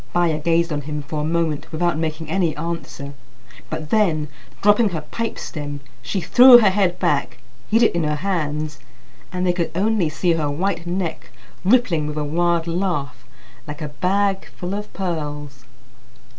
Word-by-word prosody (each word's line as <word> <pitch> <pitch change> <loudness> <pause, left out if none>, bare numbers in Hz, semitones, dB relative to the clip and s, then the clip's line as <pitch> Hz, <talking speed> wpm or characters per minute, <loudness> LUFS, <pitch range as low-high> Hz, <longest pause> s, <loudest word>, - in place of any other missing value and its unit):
Baya 170 -3 +2
gazed 170 +1 +1
on 145 - -2
him 150 0 -5
for 150 +1 -4
a - - -2
moment 160 -1 -1
without 175 +1 0
making 160 0 -3
any 165 -1 0
answer; 160 -3 -5 0.6
but 155 -1 -5
then, 165 -9 +2 0.3
dropping 210 +2 +5
her 165 -4 -4
pipe 230 +9 -4
stem, 145 -2 -5 0.2
she 120 +11 -2
threw 245 +7 +9
her 210 -5 +5
head 185 -3 +1
back, 140 -8 0 0.3
hid 225 +2 +4
it - - +4
in 170 -1 0
her 150 0 0
hands, 150 -4 -2 0.5
and 180 0 -2
they 180 - +3
could 175 -2 -1
only 200 -3 +2
see 170 +3 +1
her 155 -3 0
white 170 +3 -2
neck 175 -2 -3 0.3
rippling 185 -8 +3
with 150 0 -5
a 150 - 0
wild 170 +2 +1
laugh 170 -8 -2 0.4
like 150 +1 -6
a 150 - -4
bag 195 +6 0
full 180 +2 -6
of 210 +1 -5
pearls. 145 -7 -5
165 Hz, 170 wpm, -21 LUFS, 150-185 Hz, 0.6 s, threw